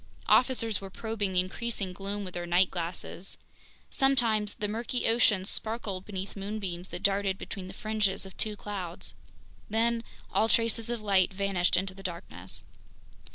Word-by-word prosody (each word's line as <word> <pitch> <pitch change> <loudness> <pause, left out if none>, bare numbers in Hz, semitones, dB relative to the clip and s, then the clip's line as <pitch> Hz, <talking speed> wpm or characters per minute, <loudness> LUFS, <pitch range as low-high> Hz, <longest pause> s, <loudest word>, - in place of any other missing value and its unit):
Officers 230 -5 +4
were 195 - -6
probing 205 -1 -2
the 180 - +4
increasing 195 0 -2
gloom 200 +2 -4
with 185 - -7
their 175 0 -4
night 175 +2 +4
glasses. 175 +1 -5 0.5
Sometimes 235 -7 +3
the 210 - -2
murky 230 +3 -2
ocean 225 -4 +4
sparkled 210 -3 0
beneath 195 -1 -5
moonbeams 195 -3 -3
that - - -7
darted 195 -1 +2
between 190 -1 -6
the 190 - -8
fringes 210 -3 0
of 190 - -11
two 215 -1 -2
clouds. 190 -4 -5 0.6
Then 230 +2 +2 0.3
all 220 - +3
traces 230 0 +2
of 240 -2 -2
light 195 -3 +4
vanished 190 -2 +2
into 190 +1 0
the 195 - -11
darkness. 170 - -5
200 Hz, 155 wpm, -30 LUFS, 185-220 Hz, 0.6 s, Officers